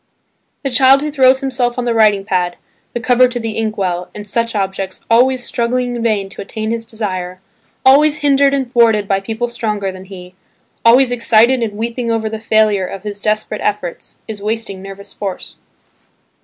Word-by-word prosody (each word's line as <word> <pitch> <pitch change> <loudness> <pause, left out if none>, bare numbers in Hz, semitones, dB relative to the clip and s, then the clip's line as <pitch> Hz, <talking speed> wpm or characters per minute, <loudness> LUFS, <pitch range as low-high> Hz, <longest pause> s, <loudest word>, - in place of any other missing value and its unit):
The 275 - -2
child 265 +2 +5
who 300 0 -3
throws 265 -2 +4
himself 255 -2 -1
on 250 - -1
the 240 - +1
writing 210 -3 +3
pad, 180 -4 -1 0.4
the 240 - -2
cover 250 +2 +4
to 245 0 -4
the 225 -1 -3
ink 220 0 -2
well, 180 -2 -2
and 210 0 -8
such 230 +2 -1
objects, 195 -1 -3
always 250 +2 +4
struggling 245 +1 -1
in 235 - -4
vain 215 -4 0
to - - -8
attain 220 +2 -4
his 230 0 -3
desire, 185 -6 -4 0.5
always 290 +3 +5
hindered 280 -1 +4
and 270 -3 -2
thwarted 225 -4 +3
by 195 -1 +1
people 225 +4 -3
stronger 215 -5 -3
than 185 0 -11
he, 180 -2 -11 0.5
always 245 +2 +5
excited 235 +1 +3
and 220 -3 -2
weeping 235 +1 -3
over 225 -1 -1
the 220 0 -5
failure 215 -4 +2
of 195 +1 -8
his 205 -1 -6
desperate 215 0 -1
efforts, 200 -5 -3
is 215 -2 -7
wasting 210 -2 -4
nervous 195 +1 -10
force. 195 -3 -6
225 Hz, 185 wpm, -16 LUFS, 200-245 Hz, 0.5 s, child